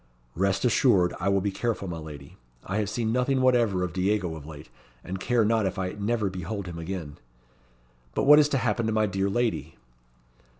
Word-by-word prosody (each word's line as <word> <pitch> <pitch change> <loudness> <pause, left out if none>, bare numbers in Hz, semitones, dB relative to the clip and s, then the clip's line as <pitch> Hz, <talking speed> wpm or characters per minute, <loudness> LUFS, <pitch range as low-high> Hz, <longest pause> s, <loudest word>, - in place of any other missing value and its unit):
"Rest 95 - 0
assured 110 -7 +3
I 95 +2 0
will 100 0 +2
be 100 +1 -1
careful, 105 0 -2
my 85 -2 -5
lady. 75 -3 -10 0.3
I 95 - -2
have 105 -2 -1
seen 110 0 -1
nothing 125 +2 +1
whatever 120 -8 +3
of 90 -3 -3
Diego 95 -1 0
of 75 -2 -10
late, 75 -1 -10 0.3
and 95 +1 -5
care 120 +1 +2
not 110 -2 +2
if 95 - -4
I 90 -1 -2
never 105 +1 -1
behold 95 +2 -5
him 85 -2 -7
again. 80 -4 -6 1.0
But - - +1
what 150 +2 +8
is 150 -1 +4
to 140 - +1
happen 115 -2 0
to - - 0
my 110 0 +2
dear 95 0 -1
lady?" 120 +3 -1
100 Hz, 200 wpm, -26 LUFS, 90-115 Hz, 1.0 s, what